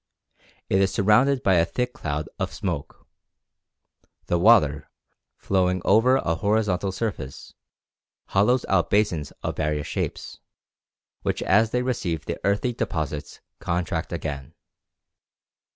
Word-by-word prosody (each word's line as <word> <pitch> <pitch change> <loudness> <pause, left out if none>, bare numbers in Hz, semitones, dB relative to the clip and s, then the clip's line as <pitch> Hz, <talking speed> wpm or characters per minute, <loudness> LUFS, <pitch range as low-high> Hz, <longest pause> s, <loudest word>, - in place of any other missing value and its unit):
It 95 - +2
is 95 -1 +2
surrounded 125 +7 +3
by 95 -2 +4
a 85 - +5
thick 125 +7 -2
cloud 75 +1 -4
of - - -2
smoke. 85 -7 -5 1.2
The 85 - 0
water, 85 -8 +4 0.5
flowing 95 -1 +1
over 115 +6 +5
a 85 -11 0
horizontal 100 0 0
surface, 95 - -5 0.8
hollows 110 +6 +2
out 90 -3 +2
basins 95 -8 +1
of - - -3
various 75 -1 -1
shapes, - - -4 0.8
which - - -2
as 110 +4 +3
they 125 +2 0
receive 90 - -2
the - - -4
earthy 105 +5 +1
deposits 75 -8 -4 0.2
contract 85 -1 -2
again. 70 -3 -5
95 Hz, 120 wpm, -24 LUFS, 80-110 Hz, 1.2 s, a